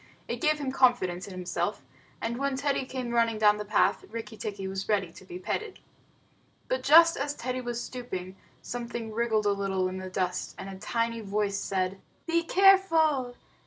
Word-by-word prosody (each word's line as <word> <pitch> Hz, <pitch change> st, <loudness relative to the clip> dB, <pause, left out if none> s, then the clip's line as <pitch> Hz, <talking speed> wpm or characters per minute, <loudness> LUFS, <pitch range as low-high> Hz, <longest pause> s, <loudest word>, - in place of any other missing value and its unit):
It -, -, -4 dB
gave 305 Hz, -2 st, +3 dB
him 280 Hz, -3 st, -3 dB
confidence 240 Hz, -10 st, +2 dB
in -, -, -9 dB
himself, 185 Hz, 0 st, -3 dB, 0.4 s
and 235 Hz, +2 st, -2 dB
when 275 Hz, -1 st, 0 dB
Teddy 280 Hz, -1 st, 0 dB
came 255 Hz, -2 st, -4 dB
running 230 Hz, -2 st, +2 dB
down 210 Hz, -1 st, +5 dB
the 210 Hz, -, -4 dB
path, 205 Hz, 0 st, +2 dB
Rikki 225 Hz, 0 st, -6 dB
tikki 200 Hz, -2 st, -5 dB
was 190 Hz, +1 st, -4 dB
ready 195 Hz, -5 st, +1 dB
to -, -, -13 dB
be 180 Hz, -1 st, -8 dB
petted. 405 Hz, -, -4 dB, 0.9 s
But -, -, -1 dB
just 330 Hz, +2 st, +7 dB
as 285 Hz, +1 st, -2 dB
Teddy 255 Hz, +1 st, -3 dB
was 240 Hz, -1 st, -3 dB
stooping, 190 Hz, -7 st, -6 dB, 0.3 s
something 235 Hz, -2 st, -5 dB
wriggled 220 Hz, -2 st, +1 dB
a 205 Hz, -, +4 dB
little 195 Hz, -2 st, 0 dB
in 185 Hz, 0 st, -5 dB
the 185 Hz, 0 st, -6 dB
dust, 185 Hz, -1 st, -2 dB
and 195 Hz, -, -7 dB
a 190 Hz, -1 st, -8 dB
tiny 230 Hz, +2 st, -1 dB
voice 200 Hz, -1 st, -1 dB
said: 190 Hz, 0 st, -2 dB, 0.2 s
"Be 335 Hz, 0 st, +2 dB
careful. 330 Hz, -9 st, +4 dB
230 Hz, 180 wpm, -28 LUFS, 195-265 Hz, 0.9 s, just